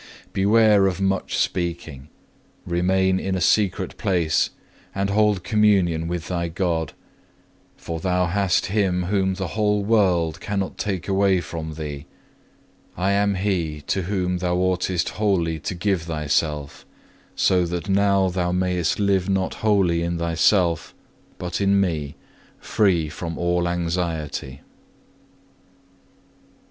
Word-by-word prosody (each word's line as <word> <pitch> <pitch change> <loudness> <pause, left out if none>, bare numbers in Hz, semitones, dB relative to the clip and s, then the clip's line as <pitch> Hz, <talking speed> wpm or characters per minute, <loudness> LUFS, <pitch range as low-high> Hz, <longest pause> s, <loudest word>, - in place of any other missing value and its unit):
Beware 105 0 +4
of 95 -1 -2
much 95 -1 -1
speaking; 85 -6 -3 0.6
remain 95 +2 +1
in 95 0 -2
a - - -1
secret 95 +3 +1
place, 85 -5 +1 0.5
and 100 0 -1
hold 105 -3 +2
communion 95 -6 +2
with 85 -1 -4
thy 85 -2 -2
God; 85 -2 -2 0.8
for 80 -1 -5
thou 90 +1 +1
hast 95 0 +1
Him 95 -3 0
whom 95 0 0
the 95 -2 -4
whole 105 +1 +1
world 90 -7 +2
cannot 100 0 -3
take 95 -4 -3
away 95 -1 +2
from 80 -1 -6
thee. 75 -3 -6 0.9
I 95 +3 +1
am 100 0 +2
He 90 -6 -1
to 95 +6 -1
whom 90 -1 -1
thou 90 0 0
oughtest 90 -1 0
wholly 90 -7 0
to 90 +4 -4
give 95 0 0
thyself; 75 -2 -2 0.5
so 90 -2 +2
that 90 +3 -4
now 100 -1 +3
thou 90 -1 -1
mayest 90 -2 0
live 100 -2 +1
not 95 -1 0
wholly 95 -6 +2
in 85 0 -2
thyself, 85 0 +1 0.4
but 90 +1 -4
in 100 0 +3
Me, 75 -7 -1 0.4
free 90 -7 +1
from 80 +2 -6
all 85 0 0
anxiety. 85 -4 -2
(1) - - -9
Mark - - -23
xiv. - - -28
90 Hz, 135 wpm, -23 LUFS, 85-100 Hz, 0.9 s, Beware